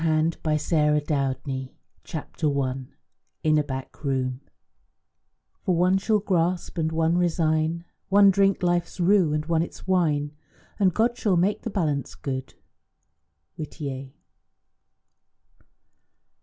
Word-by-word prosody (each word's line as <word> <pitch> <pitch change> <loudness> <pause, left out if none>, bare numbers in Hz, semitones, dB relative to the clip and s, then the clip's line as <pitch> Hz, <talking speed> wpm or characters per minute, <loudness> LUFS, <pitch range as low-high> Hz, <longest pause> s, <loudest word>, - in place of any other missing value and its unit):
CONCLUSION 160 0 +2
A 155 - +2 0.5
VANISHED 150 - -12
HAND 135 -1 -2 0.3
CHAPTER 150 -2 -2
I 130 -1 0 0.7
IN 155 -1 +4
A - - +1
BACK 135 +1 -7
ROOM 130 -2 -1 1.2
"For 180 - +1
one 180 +3 +3
shall 215 +2 +2
grasp, 180 -3 0
and 160 0 0
one 165 +2 +2
resign, 165 -1 +1 0.2
One 200 0 +7
drink 195 -1 +2
life's 175 0 0
rue, 180 -2 +4
and 150 0 -1
one 165 0 +1
its 170 - -6
wine, 155 -6 +1 0.5
And 190 -2 +4
God 230 +6 +1
shall 195 -5 +2
make 190 +5 +1
the - - -4
balance 150 - -1
good." 130 -2 -5 1.0
WHITTIER. 140 -4 -6
160 Hz, 120 wpm, -25 LUFS, 145-180 Hz, 1.2 s, One